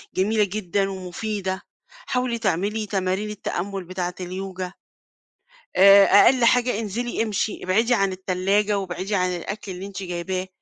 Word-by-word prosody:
جميلة 210 +3 +2
جدًا 195 -1 -1
ومفيدة. 190 +1 -4 0.3
حاولي 255 - -3
تعملي 210 +2 -1
تمارين 195 +1 -1
التأمل 195 -2 -4
بتاعة 180 0 -4
اليوجا. 185 0 -5 1.0
آآ، 195 +1 +8
أقل 240 +5 +6
حاجة 245 -2 +3
انزلي 225 +2 -2
امشي 215 -1 -2
ابعدي 225 +7 +2
عن 195 -4 +2
التلاجة 195 +2 0
وابعدي 190 +2 -3
عن 180 -1 +1
الأكل 195 +3 -5
اللي 185 +1 -6
أنتِ 195 -1 -7
جايباه، 185 +1 -3
195 Hz, 130 wpm, -23 LUFS, 185-215 Hz, 1.0 s, آآ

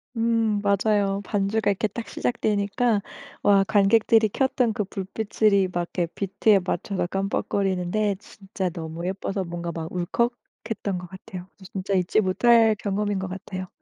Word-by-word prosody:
음 225 -2 +1
맞아요. 200 0 +2
반주가 205 +1 0
이렇게 205 +2 +1
딱 225 +3 -7
시작되니까 215 -1 0 0.4
와 200 -1 +5
관객들이 220 +2 +4
켰던 250 0 +1
그 210 - -1
불빛을 205 +2 0
이 195 -1 +4
막 175 - -1 0.2
이렇게 175 - +2
비트에 200 +3 +2
맞춰서 185 +1 -1
깜빡거리는데 195 +1 0
진짜 195 -2 -5
너무 165 0 -6
예뻐서 195 +1 -2
뭔가 170 -1 -5
막 160 0 -5
울컥했던 210 +1 -3
것 180 0 -7
같아요. 185 -1 -9 0.2
진짜 195 0 -3
잊지 185 +3 +2
못할 225 +3 +4
경험인 205 -1 -1
것 190 - -3
같아요. 185 0 -6
200 Hz, 325 characters per minute, -25 LUFS, 185-215 Hz, 0.4 s, 와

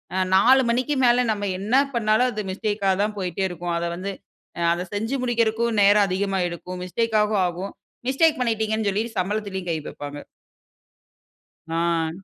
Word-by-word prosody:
அ - - 0 0.2
4 255 +7 +6
மணிக்கு 255 +5 +1
மேல 245 +1 +4
நம்ம 205 -1 -2
என்ன 210 +6 0 0.2
பண்ணாலும் 230 +2 +3
அது 215 -2 -3
மிஸ்டேக்கா 205 0 0
தான் 210 0 -2
போய்ட்டே 185 0 -2
இருக்கும். 175 0 -4
அத 170 - -2
வந்து 195 +3 -4 0.5
அ - - -2
அத 175 - -3
செஞ்சு 225 +6 -2
முடிக்குறக்கும் 235 -1 +1
நேரம் 205 0 +6
அதிகமா 195 +1 -1
எடுக்கும். 180 +1 -7
மிஸ்டேக் 225 +5 -1
ஆகவும் 210 -2 +1
ஆகும். 180 +3 -5 0.4
மிஸ்டேக் 310 +3 +3
பண்ணிட்டீங்கனு 220 -2 0
சொல்லி 205 +3 0 0.2
சம்பளத்திலயும் 190 -1 -3
கை 160 - 0
வைப்பாங்க. 145 0 -7 1.5
ஆ. 165 -1 0
205 Hz, 150 wpm, -23 LUFS, 185-225 Hz, 1.5 s, 4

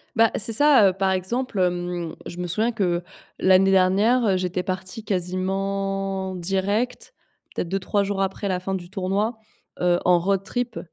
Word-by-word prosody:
Bah, 230 0 +4
c'est 225 +2 0
ça, 275 -5 +6
heu, - - -2
par 190 0 0
exemple, 200 +4 -2
hem, 175 -2 -1
je 175 - -8
me 180 - -3
souviens 220 +7 0
que 180 -5 -1 0.4
l'année 190 +1 +5
dernière, 200 +6 +3
heu, 190 -3 +2
j'étais 180 0 -2
partie 185 +3 -5
quasiment 195 +1 -2
direct, 200 +7 -2 0.4
peut-être 170 - -3
2-3 195 +1 0
jours 195 0 -2
après 195 +1 -2
la 185 -2 0
fin 195 +1 -4
du 175 -2 -5
tournoi, 200 +4 -1 0.4
heu, 175 0 +2
en 180 -1 +5
road 195 +2 0
trip 245 +3 -3
195 Hz, 165 wpm, -23 LUFS, 185-205 Hz, 0.4 s, ça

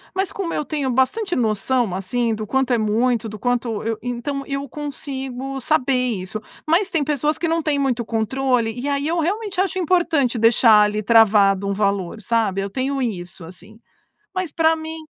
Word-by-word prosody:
mas 385 0 -1
como 370 -4 -4
eu - - -1
tenho 290 -3 -2
bastante 300 - +1
noção 230 -1 0
assim 225 +5 -1
do 215 0 -5
quanto 265 +2 0
é 240 - +4
muito 225 +2 +1
do 215 - -8
quanto 240 -2 -1
eu 225 0 -2
então 245 +3 -3
eu 275 0 -3
consigo 270 -2 -5
saber 275 -2 +1 0.2
isso, 200 +2 -5 0.3
mas 360 +5 +2
tem 325 -5 0
pessoas 295 +1 0
que 335 - -1
não 330 0 +1
têm 300 -2 0
muito 260 -4 0
controle. 235 +1 0
E 250 +3 -4
aí 280 +1 -1
eu 335 +2 0
realmente 395 +3 -2
acho 380 -1 -1
importante 325 -8 +1
deixar 225 -1 +6
ali 210 +1 -1
travado 205 -3 +4
um 200 - 0
valor, 200 -1 -1
sabe, 215 -3 0
eu 200 - -3
tenho 270 +3 -2
isso 180 -7 -4
assim, 190 +6 -13 0.6
mas 370 -4 -2
para 325 0 +3
mim 320 0 -7
250 Hz, 180 wpm, -21 LUFS, 220-300 Hz, 0.6 s, deixar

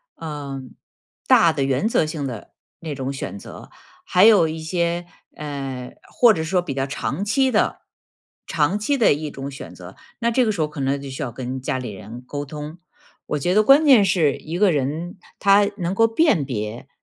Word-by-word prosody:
呃， 145 -4 -6 0.7
大 165 -1 +5
的 140 -3 -1
原 135 +8 +1
则 220 - +2
性 155 -2 -4
的 120 -5 -7 0.3
那 155 -3 -5
种 135 0 -4
选 135 -6 -6
择， - - -11 0.3
还 180 +3 +4
有 210 -7 +6
一 160 +1 -4
些， 170 +1 -1 0.3
呃， 135 -4 -6 0.2
或 240 -3 +5
者 160 -5 -2
说 180 +3 +1
比 175 -5 -3
较 135 0 -2
长 155 +6 -3
期 260 +5 +2
的， 215 - +1 0.7
长 170 +6 +1
期 280 +7 0
的 230 - +4
一 150 +1 -4
种 135 0 -7
选 90 -10 -10
择， 90 +1 -12 0.2
那 235 0 +1
这 255 +2 +3
个 220 - +1
时 200 - -5
候 155 - +2
可 150 0 -10
能 135 +1 0
就 140 - -8
需 130 - -6
要 135 -4 -3
跟 130 +2 -5
家 130 - -2
里 125 -4 -5
人 110 +5 -10
沟 145 +2 -5
通。 150 +3 -8 0.5
我 150 - -1
觉 175 +6 0
得 210 - +5
关 275 +8 +6
键 260 -8 +7
是 170 -7 +2
一 165 +3 -6
个 200 0 +4
人， 160 +6 -3 0.2
他 200 0 +5
能 175 -1 -2
够 225 +3 +4
辨 225 - +2
别 115 -2 -5
155 Hz, 215 characters per minute, -22 LUFS, 135-195 Hz, 0.7 s, 键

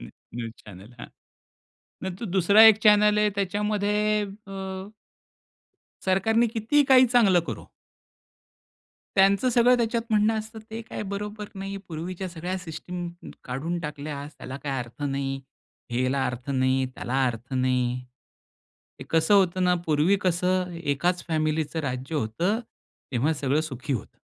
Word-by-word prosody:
New - - -9 0.3
news 115 -2 -4
channel, 100 +3 -13
हां. - - -8 1.0
नंतर 190 +4 -4
दुसरा 200 +5 +7
एक 210 - -4
चॅनल 210 0 +6
आहे 210 0 +3
त्याच्यामध्ये 205 +1 0 0.5
अ 195 - -8 1.5
सरकारने 220 +5 +3
कितीही 230 +6 +2
काही 260 0 +8
चांगलं 225 -7 +4
करो - - -6 1.5
त्यांचं 195 +5 +4
सगळं 245 +1 +5
त्याच्यात 235 0 0
म्हणणं 215 +1 +3
असतं 220 +1 -7
ते 225 +1 -5
काय - - -5
बरोबर 210 +1 -5
नाही, 195 +1 -5
पूर्वीच्या 175 +3 -5
सगळ्या 180 +2 -4
सिस्टम 175 +1 -6 0.4
काढून 145 +8 -3
टाकल्यास 150 -1 -6
त्याला 130 +1 -7
काही 140 -2 -2
अर्थ 120 +3 -9
नाही, 135 -1 -2 0.5
ह्याला 130 +3 0
अर्थ 125 +2 -5
नाही, 130 0 +2
त्याला 135 +2 -1
अर्थ 120 +2 -4
नाही. 125 -1 +1 1.1
हे - - -6
कसं 165 +5 +3
होतं 185 -2 +3
ना 180 0 +4
पूर्वी 155 +5 +3
कसं 180 0 0
1च 170 +5 0
फॅमिलीच 155 -1 -1
राज्य 135 -1 -3
होतं 155 - 0 0.5
तेव्हा 130 +6 +2
सगळं 145 0 0
सुखी 140 -3 -4
होतं. 120 - -5
170 Hz, 135 wpm, -26 LUFS, 135-205 Hz, 1.5 s, काही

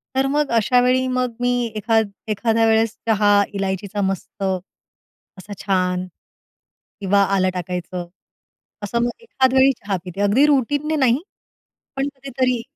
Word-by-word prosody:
तर 270 +1 +2
मग 295 -3 0
अशावेळी 250 +3 +3
मग 255 -2 -1
मी 245 0 +1 0.2
एखाद 220 0 +1 0.2
एखाद्या 225 +1 +1
वेळेस 225 0 +2
चहा 210 -2 +3 0.2
इलायचीचा 200 +1 -3
मस्त 195 +1 -3 0.9
असा 205 +2 -9
छान 185 -2 0 1.0
किंवा 200 +1 +3
आलं 185 -1 +2
टाकायचं, 180 0 -5 0.8
असं 235 +4 -1
मग 240 - +1
एखाद 260 - +1
वेळी 265 +1 +5
चहा 200 -2 -2
पिते 185 +3 -5
अगदी 215 +8 +4
रुटीनने 290 +2 +1
नाही, 260 -3 +3 0.8
पण 270 +1 -1
कधीतरी 260 -3 -1
225 Hz, 125 wpm, -21 LUFS, 195-255 Hz, 1.0 s, वेळी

